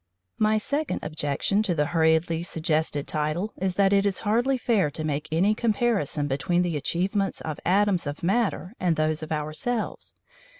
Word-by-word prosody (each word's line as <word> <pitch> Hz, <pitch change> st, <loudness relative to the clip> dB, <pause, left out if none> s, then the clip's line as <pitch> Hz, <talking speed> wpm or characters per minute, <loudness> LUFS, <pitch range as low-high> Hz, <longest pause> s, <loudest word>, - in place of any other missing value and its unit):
My 215 Hz, 0 st, +3 dB
second 285 Hz, +7 st, -1 dB
objection 155 Hz, +6 st, 0 dB
to 195 Hz, -5 st, -1 dB
the 150 Hz, -1 st, +2 dB
hurriedly 160 Hz, 0 st, +2 dB
suggested 160 Hz, -4 st, -1 dB
title 155 Hz, +7 st, -2 dB
is 190 Hz, -1 st, 0 dB
that 195 Hz, 0 st, +3 dB
it 200 Hz, 0 st, +4 dB
is 200 Hz, -2 st, 0 dB
hardly 240 Hz, +5 st, +2 dB
fair 220 Hz, -10 st, +1 dB
to 155 Hz, +2 st, -6 dB
make 150 Hz, -1 st, -2 dB
any 185 Hz, +7 st, +3 dB
comparison 215 Hz, -, 0 dB
between 175 Hz, +6 st, +1 dB
the 175 Hz, -3 st, -1 dB
achievements 190 Hz, +6 st, -1 dB
of 155 Hz, -2 st, -5 dB
atoms 190 Hz, -2 st, +2 dB
of 145 Hz, +2 st, -5 dB
matter 195 Hz, -1 st, 0 dB
and 175 Hz, -3 st, +1 dB
those 155 Hz, 0 st, 0 dB
of 155 Hz, -, -7 dB
ourselves. 155 Hz, +10 st, -3 dB
175 Hz, 165 wpm, -26 LUFS, 155-205 Hz, -, it